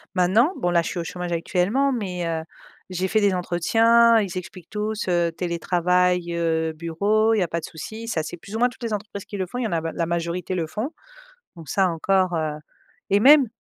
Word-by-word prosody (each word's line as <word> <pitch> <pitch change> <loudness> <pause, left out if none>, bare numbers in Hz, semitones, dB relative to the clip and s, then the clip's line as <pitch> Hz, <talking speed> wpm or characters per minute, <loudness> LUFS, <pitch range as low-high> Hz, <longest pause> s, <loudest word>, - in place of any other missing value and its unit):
maintenant 195 - +4
bon 175 - 0
là 170 - +4
je 165 - -4
suis 180 - -4
au 170 - -3
chômage 180 +1 -5
actuellement 200 +11 +1
mais 180 -7 -3
heu, 165 -1 -2 0.5
j'ai 185 +1 -1
fait 215 +3 +2
des 200 -2 +3
entretiens, 225 +7 +4
ils 190 -3 -3
expliquent 180 -1 -8
tous, 210 0 -3
heu, 175 -1 +2
télétravail, 180 +1 0
heu, 160 -1 0
bureau 200 +8 +1
il 220 - +2
y - - +3
a 175 - -1
pas 170 0 -3
de - - -6
souci, 220 +8 -8
ça 160 -7 0
c'est 165 - -6
plus 200 +5 -10
ou 225 - -2
moins 245 - +5
toutes 245 0 -14
les 230 - -2
entreprises 205 -1 -5
qui 205 - -7
le 185 -1 -2
font, 245 - -7
il - - -1
y - - 0
en - - -6
a 165 - +1
b 165 - -3
la 170 - 0
majorité 170 +1 -2
le 165 -3 -1
font 215 - -3 0.7
donc 165 -3 -11
ça 190 -2 +2
encore, 185 +2 +1
heu, 155 -1 0 0.6
et 200 - +4
même, 280 +2 +7
180 Hz, 235 wpm, -23 LUFS, 170-215 Hz, 0.7 s, même